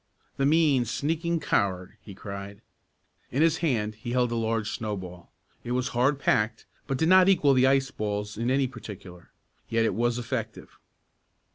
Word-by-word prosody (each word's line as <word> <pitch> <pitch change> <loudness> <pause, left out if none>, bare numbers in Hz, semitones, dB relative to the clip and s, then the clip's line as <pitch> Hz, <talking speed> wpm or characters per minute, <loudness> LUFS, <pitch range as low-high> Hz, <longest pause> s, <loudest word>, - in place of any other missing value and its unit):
"The 135 - +2
mean, 150 -5 +3
sneaking 165 +7 -1
coward!" 95 -8 -1
he 100 - -11
cried. 100 0 -8 0.7
In 140 +5 +1
his 165 -1 +3
hand 115 -10 0
he 120 +3 -6
held 125 -1 +1
a - - -1
large 115 -1 -1
snowball. 95 -5 -6 0.3
It 120 - -3
was 125 0 0
hard 130 +4 +1
packed, 110 -4 0 0.2
but 135 -2 -1
did 160 - +1
not 185 +1 +6
equal 150 -7 +4
the 130 0 +4
ice 135 0 +2
balls 105 0 -3
in 115 +3 -2
any 135 +1 +2
particular. 100 -8 -10 0.4
Yet 115 0 +2
it - - +1
was 120 +1 0
effective. 115 -2 -5
120 Hz, 165 wpm, -27 LUFS, 105-135 Hz, 0.7 s, not